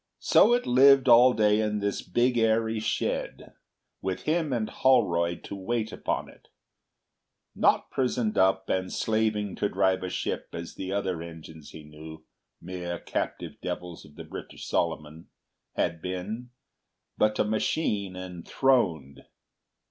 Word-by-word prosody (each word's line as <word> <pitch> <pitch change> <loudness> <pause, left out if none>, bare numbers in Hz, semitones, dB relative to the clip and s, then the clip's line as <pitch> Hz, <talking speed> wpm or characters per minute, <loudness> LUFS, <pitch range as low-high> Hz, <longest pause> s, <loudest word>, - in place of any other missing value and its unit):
So 240 +3 +5
it 245 - -2
lived 135 +1 +6
all 120 +1 +8
day 105 -2 +3
in 105 -1 0
this 100 -1 -2
big 120 +1 +1
airy 115 -1 +1
shed, 110 - -3 0.5
with 95 -1 -3
him 160 -2 0
and 115 -4 -1
Holroyd 85 -10 +2
to - - -7
wait 110 +3 -2
upon - - -3
it; - - -18 1.1
not - - +2
prisoned 125 -4 0
up 95 0 +2
and 95 0 -1
slaving 110 -2 0
to 105 - 0
drive 95 -1 +1
a 90 - -4
ship - - -3
as 85 0 -6
the 95 0 -6
other 95 -4 -2
engines 80 -2 -10
he 80 - -11
knew—mere 80 +3 -9
captive - - -5
devils 90 -2 -6
of 75 - -17
the - - -8
British - - -9
Solomon—had 80 +1 -4
been, 100 +7 -5 0.7
but 105 0 +1
a - - +3
machine 105 - -1
enthroned. 90 - -1
100 Hz, 135 wpm, -27 LUFS, 85-115 Hz, 1.1 s, all